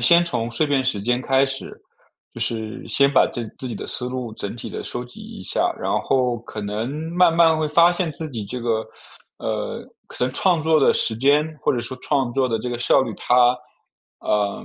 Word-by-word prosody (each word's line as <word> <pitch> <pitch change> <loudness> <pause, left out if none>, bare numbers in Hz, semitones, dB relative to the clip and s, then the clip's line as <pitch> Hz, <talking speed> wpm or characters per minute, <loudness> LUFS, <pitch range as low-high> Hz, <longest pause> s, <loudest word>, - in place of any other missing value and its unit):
先 170 +8 +6
从 120 -7 -2
碎 115 +6 0
片 140 -2 +1
时 105 -6 -1
间 125 +3 +1
开 135 +1 +3
始， 135 0 -5 0.5
就 - - -9
是 110 0 -3
先 140 0 +3
把 140 - +4
自 120 -2 -4
自 130 - -5
己 115 - -4
的 - - -6
思 125 - -2
路 125 -3 -5
整 100 -1 -5
体 120 - -7
地 - - -5
收 125 - -4
集 120 - -14
一 - - -9
下， - - 0
然 - - -2
后 125 -2 +1
可 110 -2 -8
能 105 +3 -3 0.2
慢 175 -2 +4
慢 165 -1 +5
会 155 - 0
发 170 +3 +5
现 175 -1 -1
自 160 0 -6
己 115 -5 -5
这 125 +5 -6
个， 115 -2 -1 0.5
呃， - - -3 0.2
可 125 - -3
能 130 - -2
创 170 +2 +2
作 160 0 +4
的 140 - +4
时 110 - 0
间 140 +5 +4 0.2
或 - - +1
者 120 - -1
说 120 +2 -6
创 135 -5 0
作 130 0 +1
的 115 - 0
这 125 - -4
个 120 - -3
效 120 +3 +4
率， 115 -4 -4
它， 120 - 0 0.9
呃， 105 -1 -1
125 Hz, 240 characters per minute, -22 LUFS, 115-145 Hz, 0.9 s, 先